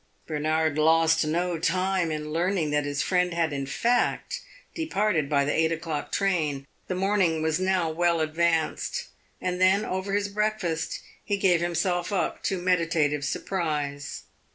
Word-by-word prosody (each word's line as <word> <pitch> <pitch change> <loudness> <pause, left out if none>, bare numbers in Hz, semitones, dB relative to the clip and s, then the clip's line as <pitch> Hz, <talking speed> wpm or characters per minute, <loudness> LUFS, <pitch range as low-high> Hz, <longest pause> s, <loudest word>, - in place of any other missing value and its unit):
Bernard 155 0 0
lost 160 0 +4
no 170 +1 0
time 185 +1 +1
in 150 0 -4
learning 170 -1 0
that 150 0 +1
his 145 0 -1
friend 180 -2 +1
had 165 -3 +1
in 135 -1 -3
fact 240 - 0 0.3
departed 210 - 0
by 140 -2 +2
the 145 - 0
eight 160 0 +2
o'clock 160 -2 -3
train 155 -8 0 0.2
the 185 - -2
morning 185 -4 +1
was 160 +1 +1
now 185 -2 +1
well 170 +1 +1
advanced; 160 +1 0 0.3
and 180 0 -2
then, 190 +3 +4
over 190 +2 -3
his 205 0 +1
breakfast, 200 -5 -2 0.2
he 205 - -1
gave 180 -4 +3
himself 175 +1 0
up 195 - -1
to 195 - -1
meditative 165 -5 +1
surprise. 145 -3 -3
170 Hz, 150 wpm, -26 LUFS, 155-185 Hz, 0.3 s, lost